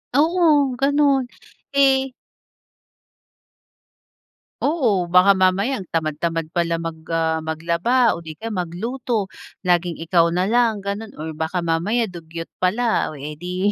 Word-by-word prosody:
Oo 300 -3 +3
ganun, 280 -1 +3 0.5
eh 270 -1 +3 2.5
Oo, 230 - +1
baka 180 +3 +6
mamaya 195 +7 +1
ang 185 - -11
tamad 155 -2 -1
tamad 165 -1 -1
pala 170 -1 0
mag, 165 -1 -4
ah, 160 -1 0
maglaba 170 +10 +1
o 170 - -7
di 160 -2 -9
kaya 225 0 -5
magluto, 210 +5 -2 0.4
laging 175 -1 +1
ikaw 170 0 +3
na 180 +2 0
lang 230 0 +2
ganun, 200 +2 -4
or 160 +1 -5
baka 160 +3 -2
mamaya 175 +9 +1
dugyot 165 -3 -8
pala, 220 +6 +1
o, 155 - -9
eh, 145 +2 -6
di, 180 +3 -1
185 Hz, 130 wpm, -21 LUFS, 165-245 Hz, 2.5 s, baka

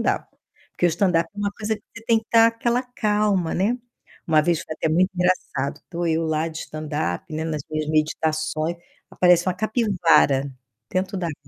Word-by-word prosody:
dava. - - 0 0.4
Porque 175 - +1
o - - +4
stand 175 +4 +1
up 165 -1 +1
é - - -12
uma 205 0 0
coisa 220 0 -2
que 205 - -21
você 225 - -10
tem 230 -1 +4
que 220 - -11
tá 230 0 +7
aquela 235 +2 0
calma, 210 -7 0
né. 220 +7 +1 0.5
Uma 155 -2 +4
vez 170 0 +1
foi 155 - -6
até 160 - -1
muito 180 +4 +3
engraçado, 180 -6 -1
tô 170 0 -2
eu 165 0 +1
lá 160 +1 0
de 160 - -7
stand 155 -1 -7 0.3
up, - - -16
né, 160 - -2
nas 155 -3 -3
minhas 155 -1 -2
meditações, 155 +1 0 0.3
aparece 180 -1 +4
uma 180 - 0
capivara 180 - +2 0.4
dentro 185 +1 -1
d'água. 170 -5 -3
175 Hz, 195 wpm, -23 LUFS, 155-210 Hz, 0.5 s, tá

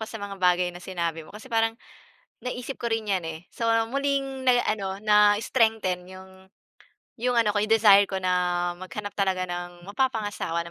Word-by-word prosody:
ako 220 - -5
sa - - -7
mga 200 -2 -7
bagay 180 -1 +2
na 175 - -10
sinabi 170 -3 -3
mo 155 - -13
kasi 210 +3 -11
parang, 225 0 +1 0.7
naisip 250 +1 -5
ko 235 - -1
rin 225 -1 -1
yan 195 -3 0
eh, 160 +1 -7
so, 230 -1 -1 0.2
muling 275 +1 -2
nag 250 -1 +3
ano, 195 -2 -2
na-strengthen 210 -2 +2
'yong, 190 0 -12 0.9
'yong 245 +2 0
ano 230 -3 +3
ko, 205 - 0
'yong 215 +2 +3
desire 205 -2 +6
ko 190 -1 -4
na, 185 - +1 0.5
maghanap 205 +3 -6
talaga 190 -2 +1
ng 175 0 -6
mapapangasawa 205 -6 -2
na 170 - -10
205 Hz, 180 wpm, -26 LUFS, 185-225 Hz, 0.9 s, desire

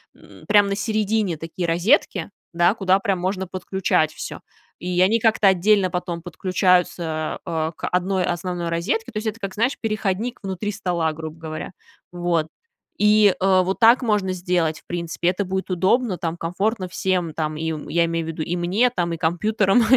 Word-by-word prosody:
м, - - -17
прямо 205 -1 +5
на 200 - 0
середине 215 -4 0
такие 165 +2 -4
розетки, 185 +5 +2 0.2
да, 175 +3 +4
куда 190 -3 +2
прям 195 -1 -1
можно 190 +1 -2
подключать 185 -3 0
всё, - - -6 0.4
и 180 0 -2
они 210 +5 +4
как-то 220 -2 +3
отдельно 190 0 +3
потом 175 -1 -4
подключаются, 180 -3 0
э, 160 -2 -1
к - - -4
одной 185 +1 0
основной 175 0 -3
розетке. 185 - -1
То 215 - -6
есть, 220 - -3
это 220 +1 -3
как, 195 -2 -5
знаешь, 235 +7 0
переходник 215 +1 -2
внутри 195 +1 -3
стола, 175 -5 -1
грубо 160 0 -7
говоря. 155 +1 -6 0.4
Вот. 175 -3 0 0.5
И, 210 -2 +5
э, 185 -1 +4
вот 190 +1 -1
так 235 +2 +6
можно 210 -6 +1
сделать, 175 -3 0
в - - -29
принципе, 170 0 -3
это 185 +3 +1
будет 190 +1 -3
удобно, 190 +3 +1
там, 165 -1 -3
комфортно 185 +4 -2
всем, 180 -2 -1
там, 155 -1 -2
им 160 -1 -4
я 170 0 +2
имею 165 0 -2
в - - -5
виду, 160 -1 -5
и 170 +3 -2
мне, 185 +8 +2
там, 175 -8 -2
и 165 - -4
компьютерам, 195 +6 +2
185 Hz, 175 wpm, -22 LUFS, 170-205 Hz, 0.5 s, так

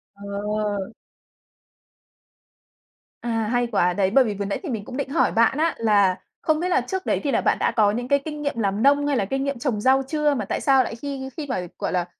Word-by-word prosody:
Ờ! 205 +1 -3 2.4
À, 225 -2 -1
hay 245 -1 +1
quá, 180 -6 +1
đấy, 190 0 +1
bởi 270 +4 +6
vì 220 -4 -2
vừa 200 0 -4
nãy 200 - -2
thì 340 - -5
mình 220 -5 -4
cũng 255 - -7
định 280 -1 -3
hỏi 315 - +2
bạn 230 +4 +3
á 325 +2 +1
là 200 -4 +3 0.2
không 310 -1 +1
biết 360 +2 -1
là 365 - +3
trước 380 -1 -4
đấy - - +1
thì 280 - 0
là - - +2
bạn - - +2
đã - - +1
có 210 -3 +3
những 245 +3 -3
cái 280 +2 +3
kinh 300 -1 -5
nghiệm 285 -4 -2
làm 200 0 0
nông, 285 +1 +4
hay 285 -2 +1
là 200 - +1
kinh 270 +6 -2
nghiệm 280 -3 -3
trồng 235 -5 -1
rau 265 +2 +4
chưa, 300 0 +1
mà 225 -7 -2
tại - - -3
sao 270 -2 +4
lại 230 - -5
khi 265 +1 -5
khi 300 - -4
mà, 180 -9 -2
gọi - - -2
là, 180 -1 0
245 Hz, 240 wpm, -23 LUFS, 205-280 Hz, 2.4 s, bởi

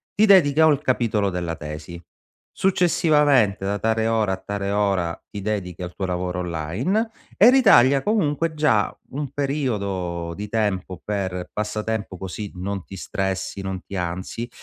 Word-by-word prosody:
ti 215 - +5
dedichi 165 -8 +5
o 160 - +7
al 145 -3 +2
capitolo 115 -5 +1
della 85 -2 -3
tesi, 75 +3 -8 0.5
successivamente 150 - +3
da 100 +1 -1
tale 110 +1 +1
ora 110 -4 +1
a 95 - -3
tale 100 +1 -4
ora 95 -5 0
ti 100 - -6
dedichi 95 -4 -3
al 90 0 -6
tuo 95 - -2
lavoro 90 0 -2
online, 90 - -1 0.3
e 220 - +8
ritaglia 160 - +6
comunque, 165 -6 +1
già 130 -9 +2 0.2
un 140 0 -4
periodo 100 - -2
di 105 +2 -6
tempo 95 -5 -1
per 95 -3 -3
passatempo 105 -2 -3
così 95 +3 -6
non 95 +1 -4
ti 95 - -10
stressi, 95 +1 -3
non 95 -1 -4
ti 100 - -8
ansi, 95 +6 -4
100 Hz, 150 wpm, -23 LUFS, 95-135 Hz, 0.5 s, e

